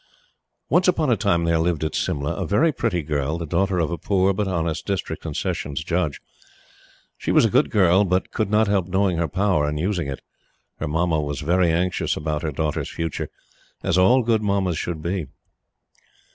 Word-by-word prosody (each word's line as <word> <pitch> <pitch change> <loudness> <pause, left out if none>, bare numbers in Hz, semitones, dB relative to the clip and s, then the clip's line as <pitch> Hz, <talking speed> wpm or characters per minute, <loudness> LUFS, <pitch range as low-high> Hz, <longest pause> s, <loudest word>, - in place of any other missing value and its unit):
Once 175 +7 +3
upon 160 -6 +2
a - - +5
time 85 -4 +1
there 85 -1 +2
lived 80 -2 0
at 80 - -2
Simla 70 0 -1
a - - -3
very 155 +11 +3
pretty 110 - -1
girl, 75 +1 -1
the 85 - -4
daughter 95 +4 0
of 80 -2 0
a 85 - -3
poor 95 -1 +2
but 105 +1 -1
honest 85 -4 -2
District 100 -2 -3
and - - -4
Sessions 75 +1 -3
Judge. 85 -4 -1 1.0
She - - -1
was - - +5
a - - +1
good - - +3
girl, 95 -1 +4
but 90 -1 0
could 110 -3 -1
not 110 +1 +3
help 100 -3 +1
knowing 95 -1 +1
her 85 0 0
power 90 -3 +1
and 75 0 -2
using 90 -2 -1
it. 70 -1 -5 0.6
Her - - -2
Mamma 80 +1 +1
was 75 +1 -4
very 85 +2 +2
anxious 90 +2 0
about 75 -1 -2
her 80 - -2
daughter's 75 0 -2
future, 80 -2 -4 0.5
as - - +1
all 120 +8 +5
good 115 -1 +2
Mammas 100 -4 0
should 80 -3 -4
be. 90 -2 -2
85 Hz, 195 wpm, -23 LUFS, 80-100 Hz, 1.0 s, a